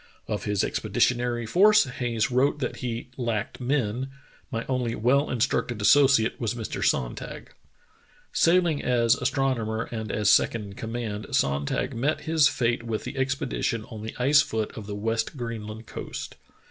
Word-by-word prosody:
Of - - -3
his 105 -2 +1
expeditionary 120 -1 0
force 210 - +5
Hayes 120 -3 -2
wrote 135 +4 +2
that 130 -4 -3
he 120 0 -4
"lacked 115 -2 -2
men. 125 -1 -1 0.4
My 115 -4 -3
only 125 -3 -1
well 135 +6 +2
instructed 120 -1 0
associate 130 +1 +4
was 115 0 -1
Mr. 115 -3 -4
Sonntag. 60 -2 -2 0.5
" - - -32
Sailing 170 -3 +3
as 120 -2 +3
astronomer 125 -4 0
and 110 -3 -4
as 105 - +3
second 115 -2 +3
in 100 -1 -9
command, 110 -1 -5
Sonntag 70 +1 0
met 135 +7 -1
his 160 -1 +4
fate 120 -1 0
with 115 -2 -3
the - - -6
expedition 130 -4 -1
on 110 -2 -7
the 110 - -6
ice 145 +4 +5
foot 110 -6 -3
of 105 -2 -8
the 105 - -4
West 115 +5 -2
Greenland 110 -2 -6
coast. - - -7
120 Hz, 155 wpm, -26 LUFS, 110-130 Hz, 0.5 s, force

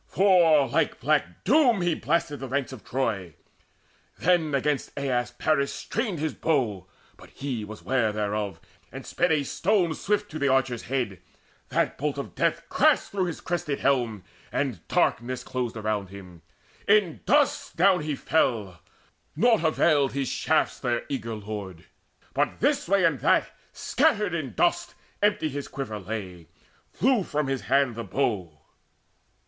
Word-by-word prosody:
For 170 -7 +4
like 155 0 0
black 140 - 0
Doom 245 - +4
he 175 -1 +2
blasted 165 -2 -1
the 135 - -5
ranks 135 +1 -2
of 125 - -10
Troy. 115 -9 -2 0.8
Then 160 -4 +2
against 140 +1 0
Aias 125 -3 0
Paris 140 -3 +1
strained 220 -6 -3
his 155 0 -2
bow; 120 - -1 0.3
But - - -15
he 130 -5 -4
was 105 0 -9
ware 125 -4 +1
thereof, 105 -1 -2 0.3
and - - -8
sped 175 0 0
a 155 -2 +2
stone 175 +3 +1
Swift 205 +4 -1
to 155 - -5
the 140 - +1
archer's 130 -3 +1
head: 125 -8 -2 0.5
that - - 0
bolt - - -1
of - - -6
death - - 0
Crashed - - +3
through 195 -2 0
his 175 - -5
crested 165 -5 -2
helm, 120 -7 +1 0.3
and 130 -10 -1
darkness 125 +2 0
closed 125 -3 -3
Round 105 -3 -2
him. 90 -4 -12 0.5
In 200 -6 +3
dust 290 0 +2
down 185 0 +4
fell 120 -9 +1
he: 85 - -19 0.6
naught 230 -5 +4
availed 150 -4 +3
His 135 -2 -1
shafts - - 0
their 120 -1 -1
eager 115 -5 -3
lord, 100 -5 -7 0.7
this 285 +3 +1
way 195 -1 +3
and 160 -6 +2
that - - +2 0.2
Scattered 205 -4 +1
in 140 - -4
dust: - - +1 0.3
empty 205 -6 +2
his 145 -1 -5
quiver 115 -6 -5
lay, 95 -5 -6 0.4
Flew 255 -1 +2
from 150 -4 -2
his 135 -1 -2
hand 135 -2 +3
the 115 +1 -5
bow. 95 - -2
135 Hz, 150 wpm, -26 LUFS, 110-170 Hz, 0.8 s, For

